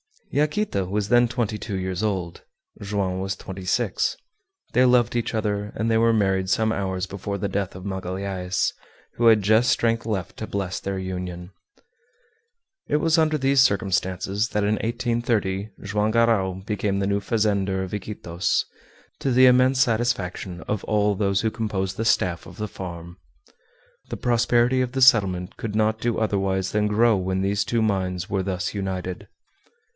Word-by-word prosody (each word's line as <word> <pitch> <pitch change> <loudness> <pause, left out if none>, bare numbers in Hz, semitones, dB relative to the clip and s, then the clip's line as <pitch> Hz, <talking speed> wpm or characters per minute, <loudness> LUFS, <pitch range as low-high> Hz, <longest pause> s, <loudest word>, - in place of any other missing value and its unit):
Yaquita 150 - 0
was 100 +2 -2
then 120 +1 +5
twenty 115 -3 -2
two 105 -1 -5
years 95 0 -3
old, 95 -6 -2 0.4
Joam 100 -2 -2
was 95 0 -2
twenty 95 -1 -8
six. 90 - 0 0.6
They 125 - +4
loved 125 -2 +3
each 120 -1 -1
other 105 -1 -2
and 115 +1 0
they 110 - +3
were 115 0 +4
married 95 -3 +1
some 110 +3 +2
hours 95 -3 -2
before 100 +1 -5
the 100 +1 -2
death 100 -1 -2
of 90 - -9
Magalhaës, 95 -1 -2 0.5
who 120 - +3
had 110 -3 +6
just 110 +5 +4
strength 115 0 +1
left 100 -6 -3
to 110 - -5
bless 95 -2 -3
their 100 0 -4
union. 90 -1 -5 1.4
It - - 0
was 160 +2 +2
under 155 -1 +3
these 135 0 +2
circumstances 100 -2 +1
that 105 - 0
in 105 +1 +2
1830 115 -4 -1
Joam 105 +2 0
Garral 115 -5 +2
became 105 -2 -1
the 100 - 0
new 100 0 +1
fazender 100 -3 0
of 95 - -7
Iquitos, 95 -3 -2 0.5
to 135 - 0
the 130 +1 +6
immense 130 +1 +4
satisfaction 110 -7 -1
of 105 +1 -3
all 105 -1 +2
those 100 -1 +1
who 110 - 0
composed 105 -4 -3
the 115 - -2
staff 90 -6 +1
of - - -12
the 105 -1 -4
farm. 85 -2 -8 0.9
The - - -4
prosperity 120 +1 +2
of 125 -1 -2
the 135 - -1
settlement 95 -8 +4
could 110 -2 -5
not 110 0 +1
do 120 0 -1
otherwise 95 -3 0
than 105 0 +1
grow 110 +1 +3
when 95 0 -1
these 100 0 0
two 115 +2 0
minds 95 -4 -1
were 95 -1 0
thus 90 -1 -3
united. 95 -2 -4
100 Hz, 165 wpm, -24 LUFS, 95-115 Hz, 1.4 s, had